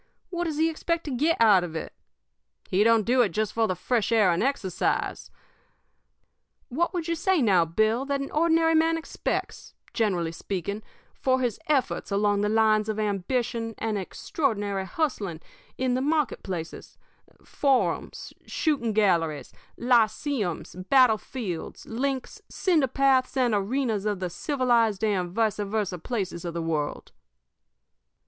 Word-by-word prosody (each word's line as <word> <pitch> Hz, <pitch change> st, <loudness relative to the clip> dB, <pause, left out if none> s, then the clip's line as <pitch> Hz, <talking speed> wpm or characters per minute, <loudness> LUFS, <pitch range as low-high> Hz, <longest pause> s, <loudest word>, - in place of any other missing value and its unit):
What 350 Hz, -1 st, -2 dB
does 315 Hz, -3 st, -3 dB
he 320 Hz, +1 st, +3 dB
expect 335 Hz, +1 st, -2 dB
to 295 Hz, -, -5 dB
get 300 Hz, +6 st, +1 dB
out 210 Hz, -5 st, +6 dB
of 165 Hz, -2 st, -6 dB
it? 160 Hz, -, -5 dB, 0.8 s
He 190 Hz, +3 st, +4 dB
don't 225 Hz, -2 st, +4 dB
do 250 Hz, +2 st, +4 dB
it 225 Hz, -, +3 dB
just 215 Hz, +4 st, -2 dB
for 225 Hz, -1 st, +2 dB
the 185 Hz, -, -1 dB
fresh 235 Hz, +3 st, 0 dB
air 215 Hz, -5 st, +4 dB
and 170 Hz, -, 0 dB
exercise. 235 Hz, -9 st, -1 dB, 1.4 s
What 335 Hz, +7 st, 0 dB
would 350 Hz, -3 st, -3 dB
you 335 Hz, -, 0 dB
say, 360 Hz, +2 st, +1 dB
now, 190 Hz, -, +4 dB
Bill, 220 Hz, +9 st, +1 dB
that 280 Hz, 0 st, -1 dB
an 275 Hz, -, -5 dB
ordinary 325 Hz, +1 st, +3 dB
man 325 Hz, +1 st, +3 dB
expects, 325 Hz, -, -4 dB, 0.2 s
generally 180 Hz, -8 st, 0 dB
speaking, 195 Hz, +4 st, -4 dB, 0.3 s
for 260 Hz, 0 st, +1 dB
his 245 Hz, -4 st, -1 dB
efforts 285 Hz, -5 st, 0 dB
along 205 Hz, 0 st, +1 dB
the 210 Hz, -, +1 dB
line 215 Hz, -1 st, +4 dB
of 215 Hz, 0 st, -2 dB
ambition 225 Hz, +3 st, -2 dB
and 220 Hz, -1 st, -2 dB
extraordinary 205 Hz, -, -2 dB
hustling 205 Hz, -, -2 dB, 0.4 s
in 255 Hz, -1 st, 0 dB
the 255 Hz, -, 0 dB
marketplaces, 260 Hz, -, -3 dB, 0.5 s
forums, 275 Hz, -3 st, 0 dB
shooting 270 Hz, -9 st, 0 dB
galleries, 170 Hz, -8 st, +1 dB, 0.2 s
lyceums, 235 Hz, -, 0 dB
battle 255 Hz, -5 st, +5 dB
fields, 195 Hz, -11 st, -6 dB
links, 260 Hz, +2 st, -3 dB
cinder 330 Hz, -8 st, +2 dB
paths, 265 Hz, 0 st, +2 dB
and 245 Hz, -3 st, +2 dB
arenas 215 Hz, 0 st, 0 dB
of 205 Hz, -3 st, -1 dB
the 180 Hz, -2 st, -3 dB
civilized 235 Hz, -, +1 dB
and 190 Hz, -5 st, +1 dB
vice 220 Hz, +3 st, 0 dB
versa 205 Hz, -3 st, -2 dB
places 190 Hz, -4 st, -4 dB
of 170 Hz, -1 st, -5 dB
the -, -, -1 dB
world?" 155 Hz, -3 st, -3 dB
225 Hz, 145 wpm, -26 LUFS, 200-275 Hz, 1.4 s, out